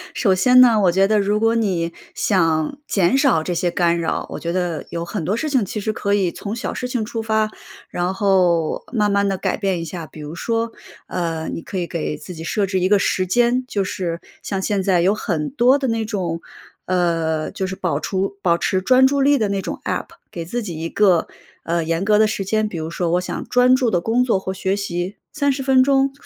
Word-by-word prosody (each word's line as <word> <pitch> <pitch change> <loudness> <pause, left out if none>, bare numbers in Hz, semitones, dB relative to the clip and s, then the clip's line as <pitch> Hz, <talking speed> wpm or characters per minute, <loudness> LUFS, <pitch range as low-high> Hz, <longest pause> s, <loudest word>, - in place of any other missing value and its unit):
首 195 -6 +3
先 250 +7 +6
呢， 235 -4 +6
我 180 - +4
觉 190 +2 +3
得 215 0 +3
如 205 +1 +1
果 225 +1 +3
你 180 -7 0 0.2
想 165 - +1
减 195 +5 +2
少 270 - +3
这 180 - -2
些 175 +1 0
干 170 -1 +1
扰， 165 - -2
我 - - -5
觉 170 - -3
得 175 -3 -2
有 170 0 -4
很 180 0 -4
多 195 +8 -1
事 310 - -2
情 265 -6 +2
其 200 +2 -4
实 215 +1 -2
可 200 -1 0
以 185 -4 +1
从 205 +2 -5
小 235 - -4
事 250 - -4
情 245 -3 -2
出 225 +1 -4
发， 220 -1 0 0.4
然 180 +1 -1
后 180 -5 +2
慢 210 -4 +1
慢 200 0 +2
地 195 -1 -1
改 - - -1
变 195 -4 -1
一 165 - -4
下。 165 0 -6
比 155 - -13
如 150 +1 -7
说， 230 +5 -2 0.4
呃， 165 -3 -3
你 - - -5
可 190 - -6
以 180 - -1
给 165 -3 -3
自 155 +5 -9
己 160 -1 -8
设 200 +4 0
置 190 -1 -1
一 185 +1 +1
个 205 - +5
时 185 -1 0
间， 240 +5 +2
就 200 -5 -1
是 175 -3 -3 0.2
像 195 -2 -3
现 200 0 0
在 185 -2 +2
有 190 +4 +3
很 165 -7 -2
多 255 +1 +4
地 275 -2 -2
那 225 -1 0
种 185 -6 -3 0.4
呃， 165 -3 0
就 190 - -3
是 190 - -5
保 170 -6 -1
除 195 +3 -2
保 170 -3 +3
持 185 +2 0
专 255 +5 +5
注 280 +1 +2
力 285 +1 +4
的 215 -4 0
那 200 -1 -1
种 - - -5
APP， - - -2 0.2
给 170 - -5
自 240 +9 -3
己 180 -7 -6
一 165 - -3
个， 185 -5 +3 0.4
呃， 170 0 0
严 165 +2 -1
格 210 +1 +3
的 215 - +5
时 210 -2 -2
间， 215 +2 0
比 195 - -6
如 160 0 -4
说 170 0 -2
我 175 +1 +2
想 180 - -5
专 250 +1 +4
注 255 -2 +3
地 175 -5 +1
工 225 +6 +1
作 235 -6 +2
或 190 0 -4
学 190 0 -1
习 190 -1 -3 0.2
30 285 -2 0
分 265 -1 +4
钟， 270 0 +3
195 Hz, 255 characters per minute, -20 LUFS, 170-225 Hz, 0.4 s, 先